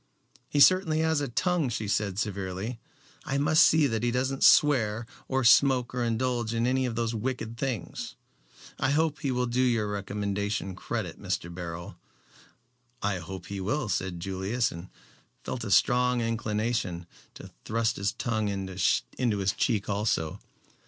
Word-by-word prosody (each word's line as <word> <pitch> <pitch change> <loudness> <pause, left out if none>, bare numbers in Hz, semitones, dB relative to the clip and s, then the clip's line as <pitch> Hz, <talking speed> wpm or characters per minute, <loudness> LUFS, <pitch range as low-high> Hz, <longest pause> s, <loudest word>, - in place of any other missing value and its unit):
"He 145 - 0
certainly 160 +1 +5
has 160 -2 +1
a - - 0
long 130 - -8
tongue," 180 -7 +1
she 110 -2 -3
said 100 -1 -1
severely. 100 +2 -3 0.4
"I 140 - -2
must 145 +2 +4
see 155 -1 +6
that 115 -5 0
he 120 - +1
doesn't 130 +2 -1
swear 115 -6 +4 0.2
or 130 0 0
smoke 125 0 +5
or 125 -1 -1
indulge 120 0 -1
in 115 +1 +1
any 130 +1 +1
of 115 - -4
those 115 0 -1
wicked 115 0 -3
things. 115 -7 -4 0.6
I - - +1
hope 155 +1 +1
he 140 - -2
will 125 -1 0
do 125 +1 0
your 120 -4 +2
recommendation 100 -1 -3
credit, - - -4
Mr. 85 0 -3
Beryl." 85 -1 -7 1.1
"I 100 -2 0
hope 95 +3 -8
he 100 -1 -5
will," 115 +5 -1
said 90 -1 -2
Julius, 95 +6 -1
and 85 +2 -9 0.5
felt 120 - -4
a 110 - -4
strong 125 +4 +3
inclination 110 -5 -1 0.3
to - - -11
thrust 115 +1 0
his 100 0 0
tongue 110 -3 -2
in 95 -1 -3
his 95 - 0
cheek 105 -5 0
also. 100 -6 -1
115 Hz, 160 wpm, -28 LUFS, 100-125 Hz, 1.1 s, see